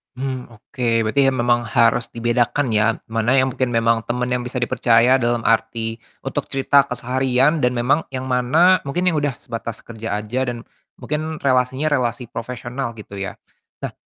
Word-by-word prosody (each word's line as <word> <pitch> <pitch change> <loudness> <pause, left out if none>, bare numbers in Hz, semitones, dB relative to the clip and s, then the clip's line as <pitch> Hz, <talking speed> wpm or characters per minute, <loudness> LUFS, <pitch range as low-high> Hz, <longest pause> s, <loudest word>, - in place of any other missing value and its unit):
Mmm, 130 -1 -4
oke 120 +3 -7 0.2
berarti 135 +5 +2
memang 120 -2 +1
harus 115 +2 +3
dibedakan 120 +4 +1
ya? 110 +1 +3 0.2
Mana 115 +3 +2
yang 130 0 +3
mungkin 130 -1 -1
memang 115 0 +2
temen 125 +1 -1
yang 125 0 0
bisa 125 +1 -5
dipercaya 120 +2 +3
dalam 120 0 0
arti 115 0 0 0.2
untuk - - -3
cerita 135 +1 +3
keseharian, 130 +4 +1
dan 125 -2 +2
memang 130 +6 +1
yang 130 - -3
mana, 155 +9 +4
mungkin, 160 +6 -1
yang 165 - 0
udah 145 -4 -1
sebatas 115 -1 -7
kerja 115 -2 -4
aja, 125 +5 -2
dan 120 -1 -4 0.3
mungkin 155 +1 -3
relasinya, 130 +3 +1
relasi 125 -2 0
profesional, 120 +1 -5
gitu 100 -2 -9
ya? 95 - -4 0.5
Nah - - -3
125 Hz, 160 wpm, -21 LUFS, 115-130 Hz, 0.5 s, mana